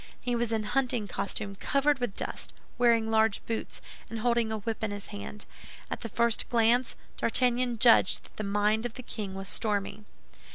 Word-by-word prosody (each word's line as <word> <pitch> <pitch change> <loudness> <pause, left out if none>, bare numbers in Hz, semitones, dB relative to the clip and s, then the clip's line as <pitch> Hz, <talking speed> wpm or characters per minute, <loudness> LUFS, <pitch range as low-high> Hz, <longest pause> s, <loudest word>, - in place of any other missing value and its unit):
He 245 -1 -1
was 235 -1 0
in 220 -1 0
hunting 245 -1 +1
costume 200 +1 -3
covered 280 +6 +1
with 245 -5 -2
dust, - - -4 0.2
wearing 230 -2 +4
large 220 -2 +2
boots, 225 -1 -4 0.3
and 230 - -4
holding 235 -1 +1
a 220 - -1
whip 220 +1 -4
in 220 - +1
his 205 0 -6
hand. 205 +1 -7 0.5
At - - -2
the 230 - -5
first 235 +2 +2
glance, 235 +1 +3 0.2
D'Artagnan 245 0 +1
judged 230 -4 +5
that - - -17
the 215 - -3
mind 210 +3 +1
of 225 - -15
the 255 - -7
king 205 -5 -5
was 195 0 -5
stormy. 210 0 -2
225 Hz, 180 wpm, -29 LUFS, 210-240 Hz, 0.5 s, judged